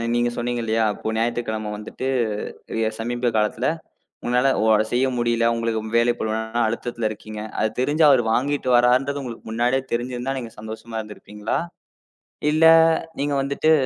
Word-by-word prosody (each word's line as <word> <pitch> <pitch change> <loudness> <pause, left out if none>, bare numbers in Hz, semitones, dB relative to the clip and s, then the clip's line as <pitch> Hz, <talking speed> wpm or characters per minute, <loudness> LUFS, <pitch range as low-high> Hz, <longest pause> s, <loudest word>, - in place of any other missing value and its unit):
நீங்கச் 120 0 0
சொன்னீங்க 120 0 -1
இல்லையா? 110 0 +1 0.3
ஞாயித்துக்கிழமை 110 -2 -1
வந்துட்டு 110 +5 -6 0.9
சமீப 120 +1 -1
காலத்துல 110 +3 +1 0.6
உன்னால 125 +2 +3 0.2
ஓ - - +2 0.3
செய்ய 130 +2 +3
முடியல. 120 -1 +1
உங்களுக்கு 115 -1 -1 0.2
வேலை 120 +1 +3
பளுவுனால 110 +2 -1
அழுத்தத்துல 115 0 -2
இருக்கீங்க. 110 0 -8 0.2
அதைத் 110 0 -1
தெரிஞ்சு 145 +5 +2
அவர் 135 -3 +5
வாங்கிட்டு 140 +1 0
வரார்ன்றது 130 +4 +2
உங்களுக்கு 120 -4 -8
முன்னாடியே 120 +3 +1
தெரிஞ்சிருந்தா 125 +2 -2
நீங்கச் 115 -3 -9
சந்தோஷமா 110 +1 -7
இருந்திருப்பீங்களா? 105 +2 -4 0.9
இல்ல 155 +2 +3 0.6
நீங்க 145 0 0
வந்துட்டு 140 +3 +2
120 Hz, 130 wpm, -23 LUFS, 110-130 Hz, 0.9 s, அவர்